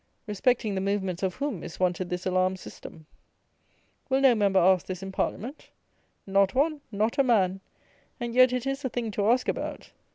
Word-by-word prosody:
Respecting 220 +1 0
the 190 - -1
movements 190 -2 -1
of 190 -2 -1
whom 280 - -3
is 170 - -9
wanted 180 0 0
this 180 0 -4
alarm 185 0 +1
system? 160 -3 -11 1.0
Will 265 0 +3
no 270 -2 +6
member 200 -3 +3
ask 185 0 +3
this 185 0 -5
in 195 - -6
Parliament? 250 +8 -4 0.6
Not 195 +2 +2
one: 295 +2 +1
not 215 +5 0
a - - +6
man: 195 -6 +2 0.6
and 240 -1 -4
yet 255 0 +6
it 250 0 -2
is 270 +1 -2
a 260 - -1
thing 230 -2 -3
to 205 +1 0
ask 250 +2 +2
about. - - -4
205 Hz, 185 wpm, -27 LUFS, 185-250 Hz, 1.0 s, no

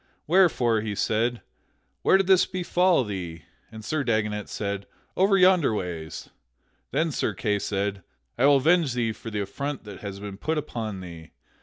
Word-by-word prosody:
Wherefore 150 - +3
he 105 -1 -3
said, 115 +4 0 0.6
"Where - - +5
did 195 - +1
this 190 -1 +5
befall 180 -3 +2
thee?" 90 - -6 0.3
And 110 -1 -10
Sir 155 -2 -1
Dagonet 105 -3 -1
said, 100 -1 -4 0.3
"Over 195 +1 +4
yonder 180 - +4
ways." 85 -5 -5 0.6
Then 160 0 0
Sir - - -1
Kay 105 -3 0
said: 100 0 -2 0.3
"I 130 +4 +4
will 145 - +6
avenge 155 0 +3
thee 115 -2 0
for 115 +1 -8
the 105 -2 -2
affront 140 +8 -4
that 105 -3 -10
hath 100 -1 -7
been 100 -1 -7
put 160 +9 -2
upon 110 -9 -4
thee. 85 -3 -10
110 Hz, 165 wpm, -26 LUFS, 100-155 Hz, 0.6 s, will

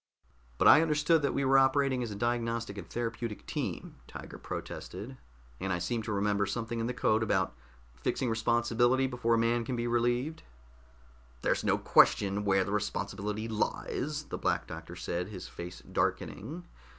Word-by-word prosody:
"But - - +4
I 150 - +9
understood 155 0 +3
that 140 - 0
we 140 - +1
were 135 +1 +6
operating 135 -1 +3
as 120 - -2
a 105 - -5
diagnostic 115 -1 -1
and 100 -4 -8
therapeutic 115 -2 -4
team," - - -4
Tiger - - -9
protested. 105 +9 -6 0.4
"And 95 - -2
I 90 - +1
seem 115 +6 -1
to 110 - -4
remember 100 0 +1
something 115 +3 -3
in 115 - -1
the 125 - -2
code 110 -3 +2
about 95 - +1 0.4
fixing 60 - -1
responsibility 120 +3 +2
before 125 -3 +1
a - - +2
man 115 +1 +2
can 125 +2 -3
be 120 0 -2
relieved." 120 +5 0 1.0
"There's - - +1
no - - +3
question 100 +1 +4
where 95 -1 +4
the 95 - -4
responsibility 105 +1 -2
lies," 145 +6 -2
the - - -6
Black - - 0
Doctor - - -8
said, 90 +1 -3
his 100 -3 -7
face 85 -8 -8
darkening. 165 - -2
115 Hz, 165 wpm, -31 LUFS, 105-125 Hz, 1.0 s, I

